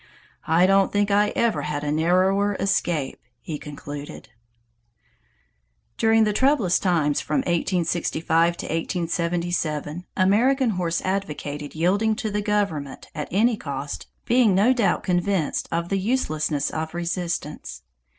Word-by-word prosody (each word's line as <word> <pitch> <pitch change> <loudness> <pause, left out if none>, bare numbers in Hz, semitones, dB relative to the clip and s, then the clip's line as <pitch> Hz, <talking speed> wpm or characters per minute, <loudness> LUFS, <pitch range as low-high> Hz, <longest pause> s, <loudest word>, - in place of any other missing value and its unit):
I 165 +3 +4
don't 195 0 +3
think 205 0 +1
I 205 +1 +3
ever 235 -2 +1
had 145 -1 -3
a 145 - -1
narrower 185 +6 +2
escape," 170 -7 -1 0.2
he 150 +2 -6
concluded. 145 0 -8 1.7
During 225 0 +4
the 210 -1 +1
troublous 255 -7 +3
times 160 -6 +1
from 275 - 0
1865 170 -2 0
to - - -6
1877, 170 -1 -2
American 235 +7 +3
Horse 175 -3 -1
advocated 150 -7 -4
yielding 200 +7 +2
to 215 0 -3
the 210 +1 -1
government 200 -10 -2
at 150 -2 -4
any 225 +6 +2
cost, 140 -3 -5 0.2
being 235 -5 +4
no 215 +7 +4
doubt 235 -6 +1
convinced 180 -3 0
of 170 +1 -2
the 195 - 0
uselessness 155 - -1
of 160 +1 -4
resistance. 175 -3 -4
175 Hz, 125 wpm, -24 LUFS, 160-205 Hz, 1.7 s, I